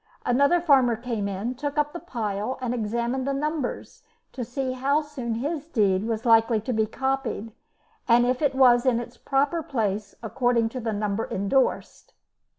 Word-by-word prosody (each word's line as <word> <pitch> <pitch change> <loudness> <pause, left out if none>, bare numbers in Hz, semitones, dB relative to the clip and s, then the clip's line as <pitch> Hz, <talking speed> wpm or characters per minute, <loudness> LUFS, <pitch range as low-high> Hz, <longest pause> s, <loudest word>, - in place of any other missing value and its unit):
Another 280 +8 +3
farmer 270 -8 +4
came 225 -3 -3
in, 200 +5 -3
took 285 +3 -5
up 295 0 +1
the 345 - -5
pile 220 - -3
and 250 -2 -2
examined 235 +3 -2
the 275 - 0
numbers 300 -1 -3 0.3
to 250 - -5
see 260 +2 -3
how 275 +4 +1
soon 265 -6 -5
his 290 +5 -3
deed 205 - +1
was 225 +1 -3
likely 225 -1 +4
to 245 +4 -3
be 220 -1 +1
copied, 265 -3 -2 0.6
and 240 0 +5
if 250 +2 0
it 280 -3 +1
was 245 -2 +5
in 240 -2 +3
its 240 0 -8
proper 285 +4 0
place 210 -8 -2
according 235 -1 +1
to 255 - -6
the 230 -2 -2
number 210 +1 -2
endorsed. 200 +8 -1
245 Hz, 170 wpm, -25 LUFS, 225-270 Hz, 0.6 s, and